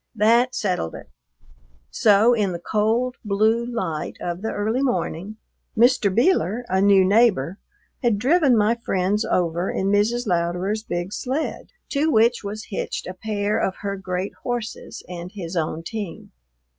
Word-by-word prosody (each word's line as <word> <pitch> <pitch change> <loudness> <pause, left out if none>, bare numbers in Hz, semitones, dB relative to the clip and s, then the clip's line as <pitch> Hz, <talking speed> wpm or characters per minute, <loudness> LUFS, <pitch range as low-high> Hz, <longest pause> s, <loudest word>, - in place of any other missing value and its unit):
That 235 +4 +3
settled 180 - -2
it; - - -11 0.8
so 215 +3 +4
in 205 -5 0
the - - -3
cold, 225 +7 0
blue 215 +3 +2
light 190 -11 -4
of 175 +1 -4
the 220 - -2
early 220 +5 -1
morning, 215 -6 -2 0.4
Mr. 240 -3 +4
Beeler, 240 - +2
a 190 +1 +2
new 195 -1 +5
neighbor, 200 - +3 0.4
had 235 -5 +2
driven 270 - +3
my 215 +2 +3
friends 210 -2 0
over 175 +1 0
in 195 +1 -1
Mrs. 225 +4 +1
Louderer's 180 +3 0
big 175 -2 -4
sled, 270 +5 -3 0.2
to 300 +3 +1
which 235 -3 +3
was 210 +2 -6
hitched 195 - -3
a 185 - -6
pair 205 +1 -1
of 190 - -1
her 200 -1 -2
great 190 0 -4
horses 240 -3 -5
and 175 0 -7
his 180 -4 -6
own 160 0 -2
team. 205 -2 -6
210 Hz, 150 wpm, -23 LUFS, 185-235 Hz, 0.8 s, new